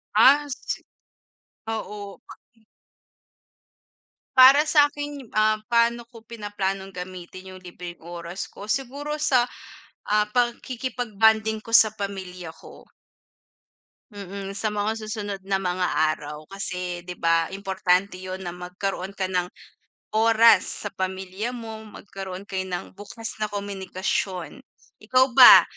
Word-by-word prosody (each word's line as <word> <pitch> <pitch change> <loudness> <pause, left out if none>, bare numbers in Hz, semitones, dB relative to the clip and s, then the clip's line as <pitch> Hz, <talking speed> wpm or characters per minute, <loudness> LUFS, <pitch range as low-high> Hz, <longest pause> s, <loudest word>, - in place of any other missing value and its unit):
Ah, 290 +2 +7
sisi 275 - -5 0.9
oo. 205 -2 -6 2.2
Para 270 +4 +9
sakin 290 -3 +1
ah 215 0 +3
paano 235 0 +2
ko 230 -2 -15
pinaplanong 205 -4 -3
gamitin 185 0 -9
yung 185 - -12
libreng 175 -1 -9
oras 170 +2 -7
ko? 200 - -10
Siguro 275 +5 -3
sa, 260 -5 +4 0.6
ah, 210 0 +3
pagkikipag-bonding 225 -3 +1
ko 230 - -13
sa 225 -2 +6
pamilya 190 -4 -6
ko. 160 - -14 1.3
Mm, 200 -1 -7
sa 200 +2 -2
mga 210 0 -1
susunod 210 -2 -4
na 195 -1 +1
mga 180 -1 0 0.2
araw. 150 0 -7
Kasi 180 -2 -4
di 180 - -5
ba 165 -1 +2
importante 190 -1 0
yun 185 0 -6
na 175 - -4
magkaroon 180 +2 -5
ka 190 -2 -2
ng 180 -1 0 0.7
oras 225 -1 +4
sa - - -5
pamilya 190 +4 -4
mo, 225 -2 -7
magkaroon 195 -2 -8
kayo 190 -1 -2
ng 185 +1 -5
bukas 215 +2 -7
na 215 - 0
komunikasyon. 190 -2 -3 0.4
Ikaw 255 +4 +3
ba? - - +12
200 Hz, 115 wpm, -25 LUFS, 185-225 Hz, 2.2 s, ba